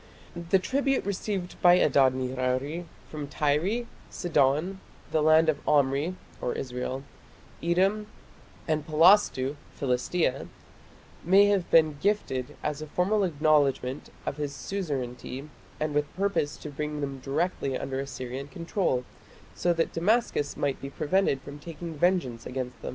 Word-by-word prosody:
The 170 Hz, +2 st, +2 dB
tribute 270 Hz, +7 st, 0 dB
received 195 Hz, -2 st, -3 dB
by 175 Hz, 0 st, +7 dB
Adad 135 Hz, -7 st, +4 dB
nirari 130 Hz, +5 st, -2 dB, 0.2 s
from 150 Hz, -2 st, -6 dB
Tyre, 155 Hz, +12 st, 0 dB, 0.2 s
Sidon, 155 Hz, +3 st, +1 dB, 0.3 s
the 155 Hz, -, +2 dB
land 155 Hz, +1 st, +5 dB
of 155 Hz, -2 st, +2 dB
Omri 145 Hz, +4 st, +2 dB, 0.4 s
(Israel), 130 Hz, +1 st, -4 dB, 0.6 s
Edom, 190 Hz, +5 st, +1 dB, 0.6 s
and 155 Hz, -2 st, 0 dB
Palastu 155 Hz, -4 st, +4 dB, 0.2 s
(Philistia) 130 Hz, +2 st, 0 dB, 0.8 s
may 195 Hz, +4 st, +6 dB
have 195 Hz, -4 st, +1 dB
been 155 Hz, -3 st, +4 dB
gifted 150 Hz, -10 st, -1 dB
as 150 Hz, 0 st, -2 dB
a 155 Hz, -, -6 dB
formal 195 Hz, +7 st, +1 dB
acknowledgment 145 Hz, -5 st, +1 dB, 0.2 s
of 140 Hz, -, -3 dB
his 145 Hz, -2 st, -3 dB
suzerainty 135 Hz, -5 st, -4 dB, 0.3 s
and 155 Hz, -1 st, -1 dB
with 145 Hz, 0 st, 0 dB
purpose 195 Hz, -6 st, 0 dB
to 150 Hz, -, -8 dB
bring 150 Hz, +1 st, -4 dB
them 135 Hz, -1 st, -4 dB
directly 140 Hz, 0 st, -1 dB
under 135 Hz, 0 st, -3 dB
Assyrian 135 Hz, 0 st, -5 dB
control, 170 Hz, -5 st, -1 dB, 0.5 s
so 175 Hz, -, +1 dB
that 165 Hz, -1 st, 0 dB
Damascus 180 Hz, -5 st, +1 dB
might 140 Hz, -2 st, -1 dB
be 135 Hz, -, -5 dB
prevented 150 Hz, -1 st, +1 dB
from 145 Hz, +1 st, -9 dB
taking 165 Hz, +2 st, -7 dB
vengeance 155 Hz, -8 st, 0 dB
against 125 Hz, -2 st, -5 dB
them. -, -, -4 dB
150 Hz, 130 wpm, -28 LUFS, 135-180 Hz, 0.8 s, by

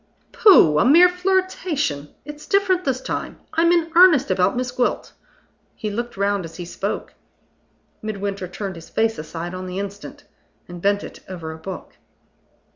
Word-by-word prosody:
"Pooh! 165 Hz, -, +6 dB
a -, -, +4 dB
mere 335 Hz, +8 st, +7 dB
flirtation. 360 Hz, -, -1 dB, 0.2 s
It's 295 Hz, 0 st, -10 dB
different 380 Hz, -2 st, +2 dB
this 260 Hz, -1 st, -1 dB
time. -, -, -5 dB
I'm 335 Hz, +1 st, +3 dB
in 335 Hz, -2 st, +1 dB
earnest 335 Hz, -, +6 dB
about 185 Hz, +4 st, +1 dB
Miss 250 Hz, 0 st, -2 dB
Gwilt." 245 Hz, 0 st, -1 dB, 0.6 s
He 215 Hz, -, -4 dB
looked 240 Hz, +1 st, -5 dB
round 200 Hz, -1 st, 0 dB
as 165 Hz, -1 st, -9 dB
he 175 Hz, -, -7 dB
spoke. 170 Hz, -, -4 dB, 0.9 s
Midwinter 200 Hz, -3 st, -4 dB
turned 190 Hz, 0 st, -6 dB
his 165 Hz, -, -12 dB
face 225 Hz, -2 st, 0 dB
aside 165 Hz, +3 st, -6 dB
on 185 Hz, 0 st, -6 dB
the 180 Hz, +1 st, -6 dB
instant, 200 Hz, +1 st, -7 dB, 0.4 s
and 175 Hz, -1 st, -9 dB
bent 200 Hz, +1 st, +1 dB
it -, -, -10 dB
over 170 Hz, -4 st, -6 dB
a 160 Hz, -, -9 dB
book. 190 Hz, +2 st, -9 dB
205 Hz, 160 wpm, -21 LUFS, -, 0.9 s, mere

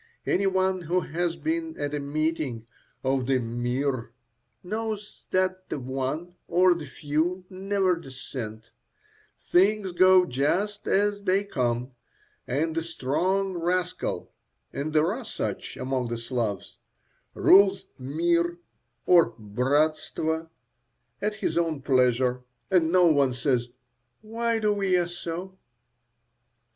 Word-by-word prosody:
Any 195 Hz, +1 st, +2 dB
one 190 Hz, -1 st, +1 dB
who 175 Hz, +2 st, 0 dB
has 170 Hz, +1 st, -2 dB
been 325 Hz, 0 st, -3 dB
at 145 Hz, 0 st, -2 dB
a 145 Hz, -, -1 dB
meeting 145 Hz, -5 st, -2 dB, 0.4 s
of 130 Hz, -1 st, 0 dB
the 135 Hz, -1 st, +3 dB
"mir" 120 Hz, +1 st, -2 dB, 0.5 s
knows 215 Hz, +1 st, -5 dB
that 185 Hz, 0 st, 0 dB
the -, -, -2 dB
one 135 Hz, +6 st, -3 dB
or 180 Hz, +1 st, +5 dB
the 165 Hz, -4 st, -6 dB
few 160 Hz, +7 st, -1 dB
never 190 Hz, -1 st, +1 dB
dissent; 130 Hz, -7 st, -8 dB, 0.7 s
things 195 Hz, +1 st, +2 dB
go 185 Hz, +1 st, +6 dB
just 180 Hz, +9 st, -1 dB
as 205 Hz, +1 st, +2 dB
they 195 Hz, 0 st, +2 dB
come, 125 Hz, -8 st, -1 dB, 0.6 s
and 155 Hz, +5 st, 0 dB
the 165 Hz, -, +1 dB
strong 175 Hz, +5 st, 0 dB
rascal 180 Hz, +1 st, -2 dB, 0.4 s
(and 145 Hz, +3 st, -3 dB
there 155 Hz, +4 st, +3 dB
are 255 Hz, +3 st, -6 dB
such -, -, -4 dB
among 130 Hz, -1 st, -1 dB
the 120 Hz, 0 st, -3 dB
Slavs) 115 Hz, -5 st, -3 dB, 0.6 s
rules 195 Hz, 0 st, +5 dB
"mir" 170 Hz, +5 st, +1 dB, 0.5 s
or 170 Hz, -10 st, +5 dB
"bratstvo" 155 Hz, +8 st, 0 dB, 0.7 s
at 210 Hz, 0 st, -1 dB
his 210 Hz, -, 0 dB
own 165 Hz, -3 st, 0 dB
pleasure, 125 Hz, -2 st, +2 dB, 0.3 s
and 170 Hz, -3 st, +3 dB
no 180 Hz, 0 st, +5 dB
one 140 Hz, -5 st, +4 dB
says, 125 Hz, -1 st, 0 dB, 0.5 s
"Why 230 Hz, +1 st, -1 dB
do 210 Hz, -2 st, +1 dB
ye 180 Hz, -2 st, +3 dB
so?" 175 Hz, +2 st, -6 dB
165 Hz, 120 wpm, -26 LUFS, 135-185 Hz, 0.7 s, go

